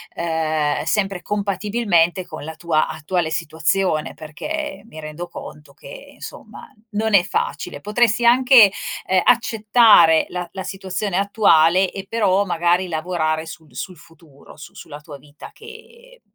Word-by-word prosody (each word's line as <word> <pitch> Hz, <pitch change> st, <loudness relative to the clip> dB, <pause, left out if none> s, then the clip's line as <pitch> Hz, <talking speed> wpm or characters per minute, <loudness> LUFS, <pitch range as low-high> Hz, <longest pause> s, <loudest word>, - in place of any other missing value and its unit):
Ehm, 160 Hz, -3 st, -1 dB
sempre 195 Hz, -3 st, -1 dB
compatibilmente 200 Hz, -3 st, 0 dB
con 155 Hz, -, -9 dB
la 160 Hz, +1 st, -8 dB
tua 160 Hz, -1 st, 0 dB
attuale 160 Hz, +1 st, -3 dB
situazione, 160 Hz, +1 st, -1 dB
perché 200 Hz, -, -6 dB
mi 160 Hz, -8 st, -12 dB
rendo 155 Hz, +3 st, -7 dB
conto 150 Hz, -3 st, -11 dB
che, -, -, -13 dB
insomma, -, -, -12 dB, 0.2 s
non 215 Hz, 0 st, 0 dB
è 185 Hz, -, +5 dB
facile. 145 Hz, -4 st, -4 dB
Potresti 225 Hz, +4 st, +1 dB
anche, 245 Hz, -3 st, +6 dB, 0.4 s
ehm, 185 Hz, -1 st, +2 dB
accettare 215 Hz, -8 st, +4 dB
la 180 Hz, -1 st, -5 dB
la 190 Hz, -, -6 dB
situazione 190 Hz, 0 st, -4 dB
attuale 190 Hz, -3 st, +3 dB
e 195 Hz, +1 st, -8 dB
però, 200 Hz, -3 st, +1 dB
magari, 175 Hz, 0 st, 0 dB
lavorare 160 Hz, -1 st, -2 dB
sul 160 Hz, -4 st, -12 dB
sul 185 Hz, +8 st, -6 dB
futuro 165 Hz, -3 st, -18 dB
su 155 Hz, -, -12 dB
sulla 145 Hz, -2 st, -11 dB
tua 150 Hz, -1 st, -11 dB
vita 145 Hz, +1 st, -14 dB
che 470 Hz, +2 st, -15 dB
185 Hz, 135 wpm, -20 LUFS, 160-210 Hz, 0.4 s, anche